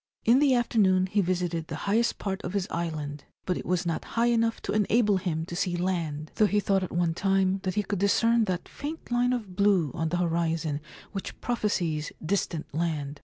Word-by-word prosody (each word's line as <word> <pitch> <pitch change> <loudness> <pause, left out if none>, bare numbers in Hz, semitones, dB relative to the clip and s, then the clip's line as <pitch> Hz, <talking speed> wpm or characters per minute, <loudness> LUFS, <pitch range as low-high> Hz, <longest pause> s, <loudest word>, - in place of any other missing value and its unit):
In 240 +4 +6
the 280 -3 +4
afternoon 195 -6 +3
he 200 +2 +1
visited 175 -3 -1
the - - -5
highest 225 +4 +2
part 195 -1 -3
of 175 - -5
his 200 -2 0
island; 150 -4 -4 0.2
but 180 - 0
it - - -6
was 180 0 0
not 165 -2 -1
high 235 +1 +4
enough 230 0 +1
to - - -2
enable 210 0 +3
him 165 -4 -2
to 170 - -7
see 180 -1 0
land, 165 -4 -2
though 215 - +5
he 210 +1 +2
thought 195 -1 +1
at 185 - -4
one 170 -1 +1
time 195 +1 +1
that 185 -1 -2
he 210 - +1
could 200 -2 -3
discern 230 +3 +3
that 185 -3 -3
faint 305 -2 -7
line 245 +1 +2
of 215 -7 -3
blue 190 -7 +3
on 160 -1 -1
the 175 - 0
horizon 165 -3 0 0.3
which 195 -2 -6
prophesies 175 -10 -1
distant 165 -4 -2
land. 150 -3 -2
185 Hz, 205 wpm, -27 LUFS, 165-210 Hz, 0.3 s, In